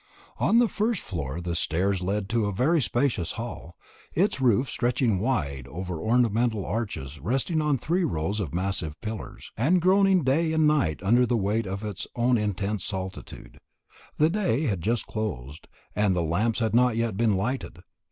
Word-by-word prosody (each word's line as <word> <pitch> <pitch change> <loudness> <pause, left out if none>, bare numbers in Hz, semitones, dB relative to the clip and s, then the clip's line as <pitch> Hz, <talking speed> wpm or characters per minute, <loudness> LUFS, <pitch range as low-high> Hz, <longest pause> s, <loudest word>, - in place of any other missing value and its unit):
On 230 - +3
the 240 0 +5
first 215 -1 -1
floor 80 -4 -4
the 85 -1 -3
stairs 90 +4 0
led 100 +2 -1
to 115 -2 +1
a - - -1
very 145 - +2
spacious 120 - 0
hall, 115 -7 -7 0.4
its 175 -5 +1
roof 125 +1 +3
stretching 120 -5 0
wide 70 - -1
over 85 +2 -5
ornamental 115 -3 +1
arches 95 - -4
resting 135 - 0
on 150 -2 +1
three 175 +8 0
rows 100 - -1
of 90 -9 -3
massive 90 -4 -2
pillars, 110 -1 -7
and 160 +11 +3
groaning 190 0 +4
day 160 +5 +2
and 160 -1 +3
night 140 - +1
under 120 +5 +4
the 120 - +1
weight 105 +1 0
of 100 +2 -4
its 105 -4 -5
own 120 +1 +2
intense 105 -1 -2
solitude. 95 - -6 0.6
The 155 +2 +3
day 180 - 0
had 100 - -1
just 115 +5 0
closed, 80 - -5 0.3
and 105 -3 +2
the 85 - +1
lamps 105 +8 0
had 110 -1 0
not 125 0 +4
yet 115 -3 0
been 110 -1 +2
lighted. 100 -4 -3
110 Hz, 170 wpm, -26 LUFS, 95-130 Hz, 0.6 s, the